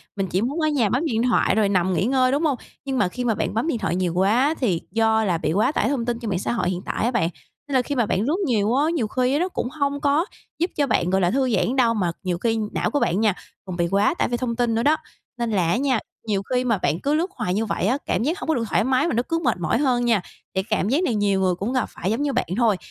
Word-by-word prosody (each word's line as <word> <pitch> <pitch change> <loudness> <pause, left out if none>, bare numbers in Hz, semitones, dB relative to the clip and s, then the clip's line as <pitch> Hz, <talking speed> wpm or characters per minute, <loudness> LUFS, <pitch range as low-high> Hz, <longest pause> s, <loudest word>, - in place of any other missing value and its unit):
mình 195 -2 -1
chỉ 185 +2 0
muốn 270 +8 -2
ở 310 - +2
nhà 270 -9 +2
bấm 260 +9 0
điện 230 -6 0
thoại 240 -5 +2
rồi 215 -2 +2
nằm 185 -1 +1
nghỉ 185 - +1
ngơi, 255 +1 +2
đúng 290 +4 0
hông? 285 -5 +1 0.3
Nhưng 270 -1 -2
mà 205 - +3
khi 250 +8 -5
mà 225 -3 +2
bạn - - -2
bấm 225 +8 0
điện 290 - 0
thoại 175 -6 -1
nhiều 180 -2 0
quá 220 - +3
thì 190 -10 0
do 220 0 +2
là 180 -5 +1
bị 160 - -1
quá 210 +9 +2
tải - - 0
thông 265 -5 -1
tin 240 -1 -2
trên 230 -3 -4
mạng 185 -3 -1
xã - - -2
hội 220 -6 0
hiện 185 0 -3
tại - - -2
á 240 - +1
bạn. 230 -9 +1 0.4
Nên 280 - -2
là 255 - +5
khi 285 +3 -4
mà 240 -3 +2
bạn 195 - 0
lướt 295 - 0
nhiều 220 -5 +1
á, 285 +3 +3
nhiều 235 -9 0
khi 255 +5 +1
nó 360 +2 0
cũng 300 - -3
hông 280 0 -2
có 290 +4 +2 0.3
giúp 345 +2 0
cho 285 -2 +1
bạn, 175 - +1
gọi 190 +1 +2
là, 175 0 +2
thư 260 0 +1
giãn 245 - 0
đâu 240 -3 +3
mà 185 -6 0
nhiều 180 -2 -1
khi 225 +3 0
não - - -1
của 290 - +1
bạn 175 -4 +1
nha, 215 -3 +3 0.3
còn 185 -2 -6
bị 170 -1 +1
quá 200 - +2
tải - - 0
vì 240 - 0
thông 240 -2 -2
tin 235 -1 +1
nữa 230 - +1
đó. 300 +4 +4 0.4
Nên 235 -1 -2
là 185 -5 +1
á 170 - +2
nha, 260 -3 +1 0.3
nhiều 200 -3 0
khi 250 +3 0
mà 230 -4 +1
bạn 160 -2 0
cứ 285 +7 0
lướt 345 +5 0
hoài 180 - -2
như 215 +3 0
vậy 205 - -2
á, 255 - +2
cảm - - 0
giác 325 +9 -1
hông - - -6
có 320 - +3
được 235 - -1
thoải - - +2
mái 260 +5 +2
mà - - -1
nó 240 - +1
cứ 330 - +1
mệt 240 -6 +1
mỏi 165 +5 +1
hơn 250 -3 +1
nha, 225 -5 +3 0.3
thì 190 - +1
cảm 215 -1 -1
giác 290 +9 +2
này 245 -10 0
nhiều 200 -2 +1
người 185 -1 +2
cũng 205 +8 -3
gặp 255 -3 +1
phải 190 - -3
giống 230 +5 -1
như 290 -1 0
bạn 250 - 0
thôi. 225 -5 +3
235 Hz, 310 wpm, -23 LUFS, 195-265 Hz, 0.4 s, là